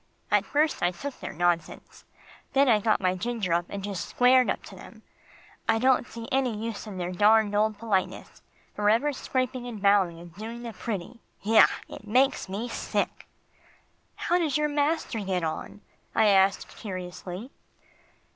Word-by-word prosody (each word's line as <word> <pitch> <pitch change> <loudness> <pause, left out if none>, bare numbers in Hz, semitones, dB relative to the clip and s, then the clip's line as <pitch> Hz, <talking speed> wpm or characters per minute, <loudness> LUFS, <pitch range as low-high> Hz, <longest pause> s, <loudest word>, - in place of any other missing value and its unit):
At - - +3
first 300 +1 +1
I 175 - +3
took 260 +10 -7
their - - -6
nonsense; 170 -1 -2 0.5
then 275 +1 +4
I 220 -4 +5
got 215 0 +1
my 185 -1 +2
ginger 210 -2 -2
up 170 +1 +1
and 200 -1 -6
just 200 -3 -4
squared 250 0 +4
up - - -2
to - - -11
them. - - -13 0.7
I - - +4
don't 255 +1 +3
see 230 0 -8
any 260 -4 +1
use 225 0 -5
in 200 -3 -7
their 180 0 -3
darned 210 +2 +4
old 215 0 +1
politeness 205 -4 -2 0.3
forever 225 +8 +2
scraping 255 -1 -2
and 230 -4 -6
bowing, 195 -4 +3
and 170 -1 -12
doing 225 +5 -7
the 230 -1 -6
pretty. 220 +2 -5 0.2
Yah! 220 +2 +7 0.2
it 215 - -11
makes 255 -1 +2
me 210 +5 -3
sick." 235 - -3 0.9
"How 350 +1 +1
does 310 -4 +1
your 300 0 +1
master 290 -4 0
get 190 -3 -2
on?" 160 +5 -4 0.3
I 220 -1 +5
asked 195 -1 +3
curiously. 185 +3 -7
215 Hz, 165 wpm, -27 LUFS, 190-245 Hz, 0.9 s, Yah